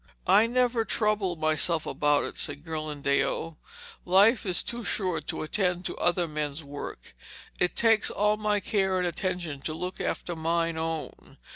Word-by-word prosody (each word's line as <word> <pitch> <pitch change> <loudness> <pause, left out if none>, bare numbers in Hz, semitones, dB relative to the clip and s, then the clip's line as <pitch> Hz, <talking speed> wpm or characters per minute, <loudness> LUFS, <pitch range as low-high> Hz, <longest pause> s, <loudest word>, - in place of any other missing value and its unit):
'I 220 +2 +6
never 245 -1 +2
trouble 210 -5 0
myself 155 +1 +1
about 145 -1 +2
it,' - - -5
said 145 0 -4
Ghirlandaio. 155 0 -1 0.5
'Life 200 +5 +4
is 180 -3 +1
too 240 0 -5
short 180 -7 -2
to - - -3
attend 180 +1 0
to - - -3
other 175 0 +1
men's 150 0 -3
work. 140 - -8 0.5
It 180 - +1
takes 225 -2 +4
all 210 +1 +2
my 210 -1 0
care 190 -3 +1
and 180 - 0
attention 175 -4 -3
to 155 +2 -3
look 180 +3 -4
after 175 - -3
mine 165 +1 0
own. 160 -1 -5
175 Hz, 155 wpm, -27 LUFS, 155-205 Hz, 0.5 s, I